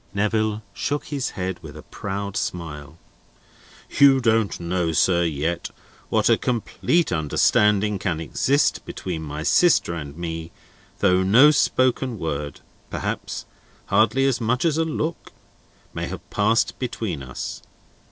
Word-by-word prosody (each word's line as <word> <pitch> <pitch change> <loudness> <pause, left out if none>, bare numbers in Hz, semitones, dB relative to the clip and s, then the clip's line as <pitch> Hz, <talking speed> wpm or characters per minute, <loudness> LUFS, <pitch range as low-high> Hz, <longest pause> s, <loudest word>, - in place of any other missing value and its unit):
Neville 110 +1 0
shook 145 +7 -2
his 140 -4 -3
head 95 -1 -3
with - - -10
a - - -10
proud 100 0 -5
smile. 80 -5 -5 1.0
"You 140 -2 +7
don't 115 -4 +1
know, 85 -1 -1
sir, 85 +2 +3
yet, 80 +2 -2 0.4
what - - +2
a - - +4
complete 125 - 0
understanding 100 +6 +2
can 85 -5 -2
exist 135 - +1
between 85 -4 -5
my 75 0 -5
sister 170 - +3
and 75 -3 -7
me, 80 -1 -5 0.5
though 90 -2 +4
no 120 +11 +6
spoken 130 -3 +1
word—perhaps 75 -4 -5 0.5
hardly 110 +6 +4
as 130 -3 +1
much 125 +6 0
as 160 -1 +2
a 165 - +2
look—may 160 +1 -6
have - - -8
passed 110 +3 +1
between 115 - -3
us. 65 -1 -6
100 Hz, 125 wpm, -23 LUFS, 85-125 Hz, 1.0 s, You